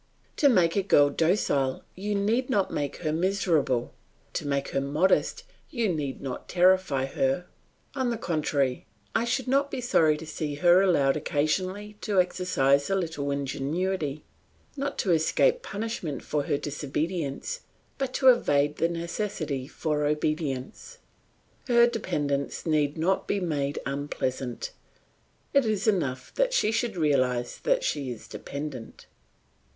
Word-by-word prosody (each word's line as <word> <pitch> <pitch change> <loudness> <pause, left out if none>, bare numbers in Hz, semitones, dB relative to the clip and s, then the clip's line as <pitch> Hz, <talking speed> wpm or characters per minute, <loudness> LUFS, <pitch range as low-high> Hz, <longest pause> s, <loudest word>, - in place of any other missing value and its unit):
To 285 - +5
make 175 -9 +3
a 200 - +3
girl 145 -7 +4
docile 145 -6 +1
you 205 +2 -3
need 225 +6 +1
not 200 -7 +1
make 145 -1 -2
her 155 -1 0
miserable; 165 -8 +1 0.4
to - - -3
make 140 -1 -1
her 135 - 0
modest 150 +7 +1 0.3
you 235 -8 0
need 145 -4 -3
not 130 -2 -6
terrify 180 -6 +3
her; 135 +5 0 0.5
on 260 -3 0
the 235 - -1
contrary, 150 - -1 0.3
I 225 - +1
should 255 +2 -1
not 275 +2 +2
be - - -4
sorry 165 -11 +3
to 160 - -8
see 155 -1 -4
her 175 +4 +5
allowed 155 -8 +3
occasionally 185 +8 -1
to 205 -3 +1
exercise 140 -7 +2
a 195 - +2
little 160 -6 -2
ingenuity, 145 +3 -2 0.5
not 280 0 -3
to 190 - +1
escape 470 - +3
punishment 210 - -4
for 145 -1 -1
her 145 - +1
disobedience, 150 - -3 0.4
but 270 -2 -1
to 265 - +6
evade 145 - +3
the 165 - +2
necessity 170 -5 -3
for 150 -1 -1
obedience. 150 - -2 0.7
Her 235 -1 +6
dependence 145 - -2
need 150 -2 +1
not 185 +4 0
be 200 - 0
made 145 -6 -1
unpleasant, 135 -3 -3 0.8
it 280 -1 +5
is 215 -2 0
enough 145 -12 0
that - - +1
she 215 - +3
should 230 -3 -1
realise 130 -6 +1
that - - +1
she 140 - -1
is 120 -3 -7
dependent. 140 -5 -7
160 Hz, 140 wpm, -27 LUFS, 140-205 Hz, 0.8 s, to